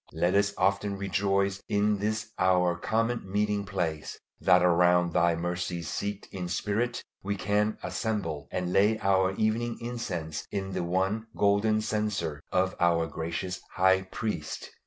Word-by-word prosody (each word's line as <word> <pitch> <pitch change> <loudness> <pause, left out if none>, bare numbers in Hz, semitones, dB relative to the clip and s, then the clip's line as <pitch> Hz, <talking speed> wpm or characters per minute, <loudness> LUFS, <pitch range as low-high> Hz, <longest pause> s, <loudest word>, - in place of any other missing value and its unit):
Let 85 +3 +1
us 100 0 +3
often 100 0 +1
rejoice 100 0 0
in 105 -1 +2
this 105 +1 -2
our 90 -1 +3
common 115 +2 -1
meeting 105 0 0
place; 85 -6 -3 0.2
that 90 -1 +5
around 90 -1 +4
Thy 85 +1 +3
mercy 90 0 -3
seat 100 +5 -4
in 90 -2 -4
spirit 105 +6 -1 0.2
we 100 +1 -2
can 105 +2 0
assemble, 85 -10 -2
and 90 -1 -2
lay 105 +3 +4
our 95 -1 +2
evening 115 +3 0
incense 90 -11 -4
in 95 -1 -3
the - - -2
one 95 +6 0
Golden 105 +2 +3
Censer 105 -9 -2
of 95 0 +1
our 85 -1 +3
gracious 85 +4 -4
High 95 0 +4
Priest! 95 -4 -4
95 Hz, 140 wpm, -28 LUFS, 90-105 Hz, 0.2 s, that